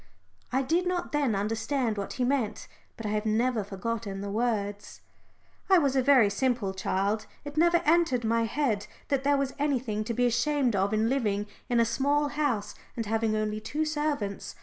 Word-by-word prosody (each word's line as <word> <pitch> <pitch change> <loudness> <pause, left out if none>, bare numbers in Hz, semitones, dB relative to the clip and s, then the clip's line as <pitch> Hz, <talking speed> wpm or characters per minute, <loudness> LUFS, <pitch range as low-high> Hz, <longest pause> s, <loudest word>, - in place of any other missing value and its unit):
I 265 +2 +1
did 340 +7 +1
not 360 -1 -2
then 285 -7 +1
understand 225 +4 -1
what 200 -1 -4
he 255 - -1
meant, 245 -5 -1 0.3
but 225 - -7
I - - -1
have 210 0 0
never 225 +1 +1
forgotten 200 0 -4
the 200 0 -4
words. 205 -2 -2 0.7
I 380 - +7
was 280 -5 +2
a 265 - +4
very 260 -4 +6
simple 225 -1 0
child. 200 +3 -1 0.2
It 290 0 -7
never 340 +2 +4
entered 310 -6 +3
my 230 +1 +2
head 225 -4 -1 0.2
that 275 -2 +1
there 285 0 +3
was 275 -1 -1
anything 255 -7 0
to 235 - -2
be 245 - +2
ashamed 245 +1 +1
of 195 +1 +1
in 215 +1 +2
living 210 -6 0 0.2
in 240 -1 +3
a 230 - +5
small 285 +5 +1
house 260 -9 -1 0.2
and 230 - -2
having 220 0 0
only 215 0 -1
two 300 +8 -2
servants. 295 -10 -2
235 Hz, 185 wpm, -28 LUFS, 215-280 Hz, 0.7 s, I